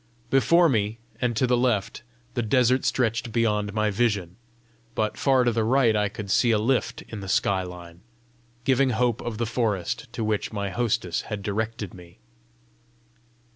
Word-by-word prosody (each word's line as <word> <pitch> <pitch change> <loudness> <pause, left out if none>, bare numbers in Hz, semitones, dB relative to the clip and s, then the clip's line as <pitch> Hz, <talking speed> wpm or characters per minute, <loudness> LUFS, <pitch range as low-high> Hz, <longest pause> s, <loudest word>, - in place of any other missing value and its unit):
Before 165 +7 +5
me 110 -5 0 0.2
and 120 -2 0
to 130 - +3
the 125 0 +2
left, 120 -4 0 0.3
the 120 - -1
desert 125 +3 +2
stretched 115 -1 0
beyond 105 -3 +1
my 110 0 0
vision, 100 -5 0 0.6
but 110 -1 0
far 135 -2 +3
to 120 - +2
the 115 -1 0
right 120 -1 +3
I 105 -1 +1
could 100 -1 -6
see 120 - +3
a 110 - +4
lift 120 +5 0
in 110 - -8
the 95 -1 -7
sky 95 0 +2
line, 90 -1 -10 0.6
giving 135 +1 +3
hope 120 -1 +1
of 115 -3 -4
the 115 - -1
forest 110 -6 -2
to 115 - -3
which 105 -1 -1
my 100 -2 -3
hostess 100 -6 -1
had 105 -2 -4
directed 110 -1 -3
me. 90 -1 -14
110 Hz, 170 wpm, -25 LUFS, 100-120 Hz, 0.6 s, Before